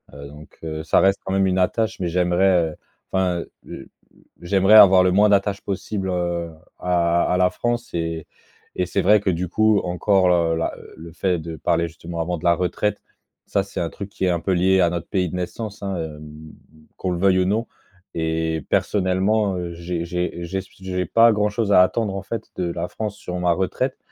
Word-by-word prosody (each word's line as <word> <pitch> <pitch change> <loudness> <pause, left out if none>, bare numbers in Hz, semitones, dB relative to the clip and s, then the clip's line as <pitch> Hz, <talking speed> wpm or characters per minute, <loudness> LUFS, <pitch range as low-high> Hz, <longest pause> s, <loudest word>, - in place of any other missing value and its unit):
heu, 70 0 -9
donc 75 +1 -14
heu, 80 -1 -5
ça 80 - +3
reste 95 0 +3
quand 95 - -5
même 95 0 +2
une 95 0 +1
attache 110 +4 0
mais 90 - -1
j'aimerais, 90 -1 +2
heu, - - -12 0.4
enfin, 95 -2 +1
heu - - -12 0.2
heu - - -5
heu, 65 - -11 0.5
j'aimerais 95 +4 +4
avoir 95 -3 +8
le 90 - +3
moins 105 +3 +4
d'attache 100 0 +1
possible, 95 0 -4
heu, 85 -1 -2 0.3
à 85 -1 +1
à - - +2
la 90 0 +3
France, 120 +5 -3
et 80 -1 -3 0.5
et 90 - 0
c'est - - 0
vrai 105 +3 +5
que 100 - -1
du 90 +2 -2
coup, 110 +1 +3
encore 90 +1 +2
l - - +4 0.2
heu, - - 0
là 80 - -1
heu, - - -14
le 80 +1 -10
fait 90 +2 0
de 80 0 -7
parler 85 +3 0
justement 85 +1 -7
avant 90 +1 -2
de 80 - -13
la 85 - +5
retraite. 90 +4 -1 0.4
Ça 100 - 0
c'est 100 - -7
un 85 - -2
truc 100 +2 -8
qui 95 - -3
est - - +2
un 85 -1 0
peu 95 +3 -1
lié 95 +2 +3
à 85 - +4
notre 85 -1 -4
pays 90 -3 0
de 90 - -6
naissance, 100 +3 -5
hein, 95 -1 -2
hem, 75 -2 -7 0.7
qu'on 95 - -2
le 90 - -2
veuille 95 0 +3
ou 90 - +2
non 110 +5 0 0.5
et 80 -1 -2
personnellement, 95 +1 +1
heu, 85 -1 -5
j'ai 85 0 -4
j'ai 90 0 -3
j'ai 95 +3 -4
s 95 - -9
p - - -26
s 95 - -13
j'ai 90 -1 -2
pas 115 +5 +5
grand-chose 105 0 0
à 90 - +7
attendre 100 0 -1
en 95 - -5
fait 110 +2 -5
de 90 -2 -2
la 85 +1 -3
France 105 +2 -5
sur 90 -3 -6
ma 90 -1 +2
retraite 95 +8 -2
90 Hz, 225 wpm, -22 LUFS, 85-100 Hz, 0.7 s, avoir